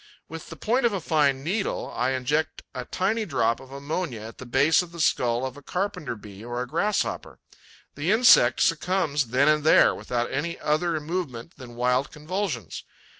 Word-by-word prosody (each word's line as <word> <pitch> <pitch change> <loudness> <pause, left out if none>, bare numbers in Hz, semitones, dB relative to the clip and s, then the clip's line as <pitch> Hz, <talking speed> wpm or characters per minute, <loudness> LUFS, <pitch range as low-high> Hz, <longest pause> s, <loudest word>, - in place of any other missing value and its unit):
With 165 0 -9
the - - -8
point 240 +2 +1
of 225 - -3
a 195 - -1
fine 145 -5 +1
needle, 195 +6 -2
I 125 +2 0
inject 145 +5 -1
a - - -5
tiny 215 +5 -1
drop 115 - 0
of 135 0 -14
ammonia 140 -2 -4
at 110 +1 -10
the 130 - -9
base 140 +7 +4
of 175 -1 -9
the 170 - -10
skull 120 -4 +1
of 130 -1 -5
a - - -11
Carpenter 180 -6 -3
bee 105 -1 -12
or 120 +1 -4
a 125 - -3
Grasshopper. 195 +9 -1 0.6
The 145 +5 -3
insect 215 - +6
succumbs 165 -5 +1
then 130 +5 +2
and 150 -1 +3
there, 155 - +6
without 120 -1 -3
any 170 +4 -3
other 155 +2 0
movement 155 -4 -5
than 125 -3 -11
wild 125 +2 +1
convulsions. 150 - -4
145 Hz, 180 wpm, -25 LUFS, 125-170 Hz, 0.6 s, insect